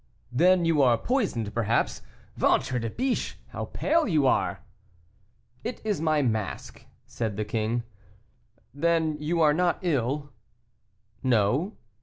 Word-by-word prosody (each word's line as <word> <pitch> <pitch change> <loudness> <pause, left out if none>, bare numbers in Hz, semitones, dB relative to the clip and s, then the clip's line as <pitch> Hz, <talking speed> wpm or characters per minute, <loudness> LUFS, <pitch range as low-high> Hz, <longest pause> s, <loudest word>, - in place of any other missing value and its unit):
"Then 175 +7 +4
you 160 -3 +3
are 125 -3 +5
poisoned, 155 - -1
perhaps. 115 0 0 0.3
Ventre 125 - +2
de 115 0 -3
biche! 255 - -2
how - - -5
pale 330 -2 +1
you 155 -8 +2
are!" 100 -7 +1 1.0
"It 235 +2 -4
is 205 -8 0
my 155 -2 +2
mask," 110 -5 -3 0.2
said 110 -4 -4
the 105 - -1
king. 110 +2 -1 0.9
"Then 160 +1 +1
you 165 +3 0
are 150 -2 +5
not 175 +1 +1
ill?" 145 -2 -1 0.9
"No." 130 - +1
145 Hz, 125 wpm, -27 LUFS, 115-170 Hz, 1.0 s, are